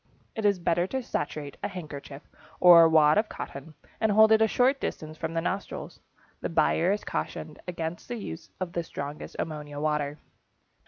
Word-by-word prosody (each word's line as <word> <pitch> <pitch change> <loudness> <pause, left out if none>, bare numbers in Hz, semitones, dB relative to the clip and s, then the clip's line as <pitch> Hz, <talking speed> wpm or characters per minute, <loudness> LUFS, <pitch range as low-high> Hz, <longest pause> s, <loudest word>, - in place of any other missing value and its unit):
It 220 - -2
is 200 -2 +4
better 175 0 +1
to 265 +4 -3
saturate 145 -7 -4
a - - -1
handkerchief 145 -5 -8 0.4
or 170 -2 +9
wad 155 +2 +5
of 215 - -1
cotton 145 +3 -8 0.2
and 220 - +2
hold 220 +1 +6
it 220 0 +6
a 220 - +5
short 260 +5 +2
distance 155 0 -4
from 160 +1 -4
the 165 - +1
nostrils. 190 +3 -4 0.4
The - - -3
buyer 165 +2 +2
is 210 +1 -1
cautioned 155 -1 -4
against 170 -1 -4
the 245 - -4
use 80 - -7
of 180 -2 -4
the 170 - 0
strongest 145 -2 -7
ammonia 150 -2 -5
water. 150 -1 -1
165 Hz, 175 wpm, -27 LUFS, 150-200 Hz, 0.4 s, or